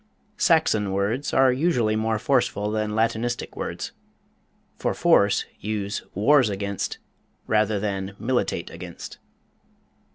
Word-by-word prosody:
SAXON 110 - +3
words 105 +8 -1
are 130 -1 +4
usually 125 -7 +1
more 110 0 0
forceful 105 0 +1
than 110 -1 -1
Latinistic 115 +2 -1
words - - -4 0.8
for - - -2
force, - - +3
use 105 -1 -3
wars 130 +4 +4
against 100 0 -3 0.5
rather 105 -1 +2
than 100 -1 -3
militate 125 +1 -1
against. - - -9
110 Hz, 105 wpm, -24 LUFS, 100-120 Hz, 0.8 s, are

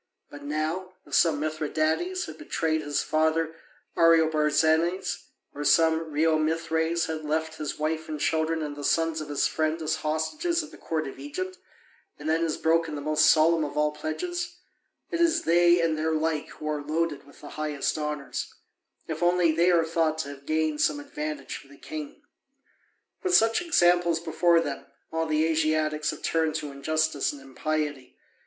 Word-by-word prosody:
But 145 - -10
now, 155 +6 -3
if - - -14
some 160 -4 +4
Mithridates 155 - -1
has - - -8
betrayed 160 - -1
his 145 -1 -1
father 160 +1 +1 0.4
Ariobarzanes, 160 +1 +3 0.3
or 145 - -5
some 160 +1 +3
Reomithres 160 +2 +1
has 160 -1 -4
left 160 +1 -2
his 150 -2 -4
wife 155 +1 -2
and 155 -1 -4
children 160 +1 0
and 145 -1 -5
the 145 - -8
sons 165 +1 +1
of 150 - -7
his 145 - +1
friend 155 +1 0
as 155 -1 -1
hostages 305 - -1
at 305 - -11
the - - -13
court 155 -2 -2
of 135 - -9
Egypt, 185 +7 -5 0.6
and 150 - -7
then 160 +1 +2
has 165 -2 0
broken 165 -1 +1
the 145 - -5
most 155 +1 +3
solemn 160 +1 +5
of 150 0 -5
all 150 0 +2
pledges 350 - -4 0.6
it 340 -1 -1
is 335 -1 +3
they 175 +1 +5
and 165 -2 +1
their 160 +1 0
like 155 -1 0
who 155 - -8
are 150 -1 -1
loaded 155 -1 -2
with 140 - -17
the 145 - -9
highest 150 -2 -2
honours, 150 -2 -4 0.5
if 160 0 -4
only 175 -1 +4
they 170 +3 +3
are 170 -2 +4
thought 160 -1 0
to 160 -3 -3
have 140 0 -11
gained 155 -1 0
some 150 -1 +2
advantage 150 -1 -5
for - - -15
the 140 0 -16
king. 155 - -8 1.0
With 370 -1 +2
such 225 +6 +4
examples 175 - +3
before 170 +1 +3
them, 145 -4 -5 0.2
all 160 0 -1
the 155 0 +2
Asiatics 155 -1 +1
have - - -6
turned 160 -1 +1
to 145 - -3
injustice 155 +1 0
and 145 - -10
impiety. 145 +1 -3
155 Hz, 175 wpm, -27 LUFS, 150-165 Hz, 1.0 s, solemn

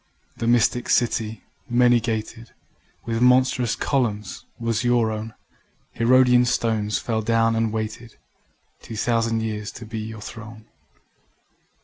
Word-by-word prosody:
The 115 - -3
mystic 120 +1 +2
city 115 -2 0 0.3
many 120 0 +4
gated, 115 0 -5 0.5
With 115 0 -2
monstrous 125 -1 +3
columns, 110 -7 -2
was 115 -2 -1
your 120 -2 +2
own: 110 +1 -6 0.6
Herodian 125 +1 +4
stones 110 -3 0
fell 110 -2 -2
down 115 +1 +2
and 115 -1 0
waited 110 +1 -5 0.6
Two 115 - -9
thousand 115 0 0
years 105 -1 -4
to 120 - -9
be 110 +1 -6
your 110 0 -7
throne. 110 0 -10
115 Hz, 120 wpm, -23 LUFS, 110-120 Hz, 0.6 s, many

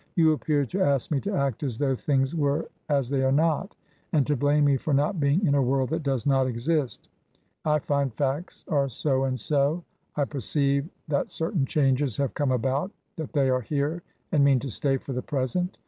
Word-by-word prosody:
" - - -41
You 160 -2 +5
appear 150 -1 +1
to 190 - -3
ask 140 -5 +1
me 140 -3 +1
to 205 - -3
act 140 - -1
as 130 -7 -3
though 135 0 +1
things 135 +1 0
were 145 -1 0 0.2
as 140 -4 +2
they 135 0 0
are 130 - +3
not, 160 +6 +1 0.4
and 150 -5 +3
to 150 - +1
blame 145 +2 +3
me 140 -1 +4
for 140 +2 0
not 150 +6 +1
being 145 +7 +2
in 145 - +3
a 140 - +3
world 130 0 +1
that 160 +2 -1
does 135 -5 -1
not 135 -2 +3
exist 130 +3 -1 0.6
I 150 -1 +3
find 140 -2 0
facts 140 +8 -3
are 140 -3 +1
so 135 +2 0
and 130 -1 -2
so; 145 +7 +1 0.3
I 145 - +1
perceive 140 - 0 0.2
that 140 -2 0
certain 160 -3 -1
changes 135 -4 +1
have 140 -2 -1
come 145 -3 0
about 130 +7 0
— - - -48
that 160 -2 -5
they 140 -3 +3
are 130 0 +1
here 145 +6 -2 0.3
and 145 -3 +4
mean 140 -1 +5
to 135 - -4
stay 135 +4 +1
for 135 - -7
the 125 - -2
present. 150 +9 -2
140 Hz, 215 wpm, -26 LUFS, 135-150 Hz, 0.6 s, You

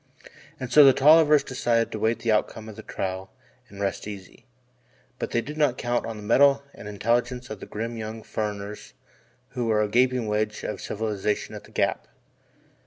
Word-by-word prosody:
And 130 -2 -5
so 150 - +9
the 135 -1 +8
Tollivers 150 +1 +6
decided 120 -3 0
to 110 - -4
await 110 +2 0
the 115 - +2
outcome 110 +1 -1
of 110 - -9
the 110 - -9
trial 95 -2 -4 0.4
and 100 - -12
rest 100 +1 -2
easy. 100 -3 -10 0.7
But - - -3
they 115 - 0
did 150 +5 -8
not 140 -4 +2
count 120 0 -1
on 115 -1 -5
the 105 - -9
mettle 140 +5 +4
and 105 - -10
intelligence 120 +4 -1
of 110 - -6
the - - -9
grim 115 +2 -5
young 110 0 -6
"furriners" 105 -1 -5 0.6
who 125 -2 -3
were 105 -1 +3
a 105 - -3
flying 125 0 +2
wedge 105 0 -1
of 105 - -4
civilization 105 -1 -2
at - - -9
the - - -18
Gap. - - -1
110 Hz, 185 wpm, -25 LUFS, 105-125 Hz, 0.7 s, so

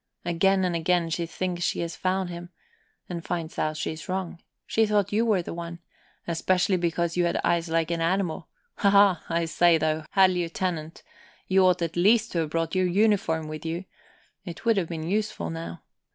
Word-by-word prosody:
Again 190 +3 +2
and 175 -2 -1
again 170 0 +1
she 170 0 -1
thinks 180 +1 -3
she's 170 -1 -2
found 185 -1 -1
him, 175 0 -8 0.6
and 170 -2 -5
finds 170 -2 -4
out 155 0 -1
she's 155 +2 -5
wrong; 185 -2 -3 0.2
she 225 -1 +2
thought 210 -2 +1
you 215 +2 +2
were 195 -5 +2
the - - -6
one, 170 0 -6 0.5
especially 180 +3 +1
because 170 -1 -1
you 175 -1 +2
had 170 - 0
eyes 170 -1 +1
like 165 0 0
an 165 -1 -1
animal. 175 0 -1 0.3
Haha! 200 -3 +5
I 170 0 0
say, 165 +1 +4
though, 155 0 -1
Herr 190 -1 +6
Lieutenant, 175 -3 -3 0.4
you 190 0 +4
ought 180 -1 +2
at 165 -1 -3
least 215 +6 +3
to 170 - -1
have 160 -2 -1
brought 165 +1 -2
your 185 -1 +2
uniform 180 -5 +1
with 155 0 -7
you. 165 +3 -4 0.6
It 175 +2 -9
would 230 -2 +3
have 175 -4 0
been 160 -2 -4
useful 200 - -2
now. 85 +1 -7
175 Hz, 185 wpm, -26 LUFS, 165-190 Hz, 0.6 s, Herr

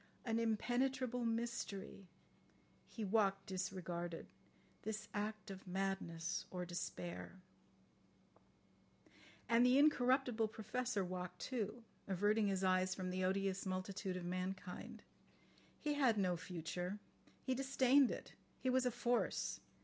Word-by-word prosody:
"An 225 -1 +1
impenetrable 245 +2 +1
mystery... 225 -4 -2 0.4
." - - -32
He 220 - -2
walked 195 -1 +2
disregarded.... 180 -2 -3 0.6
"This 215 0 -3
act 210 0 -3
of 190 0 -9
madness 190 -2 -1
or 180 -1 -3
despair." 175 +1 -5 2.1
And 235 +1 +5
the 250 +1 +6
incorruptible 255 -5 +4
Professor 220 -1 -1
walked 180 0 -4
too, 235 -2 -3 0.2
averting 205 +3 +3
his 195 -1 +1
eyes 185 0 +3
from 185 -1 -3
the 185 0 -1
odious 195 0 +1
multitude 185 0 -2
of 180 - -5
mankind. 185 +1 -4 0.8
He 295 - 0
had 260 -6 +4
no 185 -3 +2
future. 180 +2 -4 0.5
He 260 - +1
disdained 270 0 +5
it. - - -5 0.3
He 260 - +1
was 255 0 +3
a - - +2
force. 240 +1 0
200 Hz, 120 wpm, -40 LUFS, 185-240 Hz, 2.1 s, the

